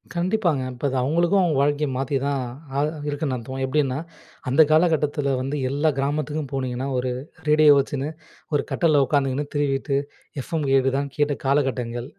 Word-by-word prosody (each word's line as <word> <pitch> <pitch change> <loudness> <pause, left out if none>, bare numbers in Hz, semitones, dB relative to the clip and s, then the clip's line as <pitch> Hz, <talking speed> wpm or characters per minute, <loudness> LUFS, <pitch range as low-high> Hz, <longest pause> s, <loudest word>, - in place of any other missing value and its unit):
கண்டிப்பாங்க. 175 -4 +1
இப்ப 125 +3 -6
அது 135 - -3
அவுங்களுக்கும் 170 +8 +2
அவுங்க 165 -6 +1
வாழ்க்கைய 145 +1 +1
மாத்தி 135 +2 -2
தான் 140 -1 0 0.4
ஆ - - 0 0.3
இருக்குன்னு 145 -2 -2
அர்த்தம். 130 +2 -6
எப்பிடின்னா, 135 -1 0 0.5
அந்த 135 +5 +5
காலகட்டத்தில 150 -3 +2
வந்து 135 +3 -3
எல்லா 145 +4 +1
கிராமத்துக்கும் 145 +1 -2
போனீங்கன்னா, 130 0 -2
ஒரு 125 0 -1 0.4
ரேடியோ 150 -1 +6
வச்சின்னு 140 +1 -2 0.4
ஒரு 145 - +2
கட்டில்ல 155 -4 +3
உட்காந்துக்கின்னு 135 +1 0
திருவிட்டு 140 -1 0 0.4
எஃப்எம் 155 +2 -3
கேக்குதான்னு 135 +1 +1
கேட்ட 145 -1 +1
காலகட்டங்கள். 130 -3 0
140 Hz, 145 wpm, -23 LUFS, 135-150 Hz, 0.5 s, ரேடியோ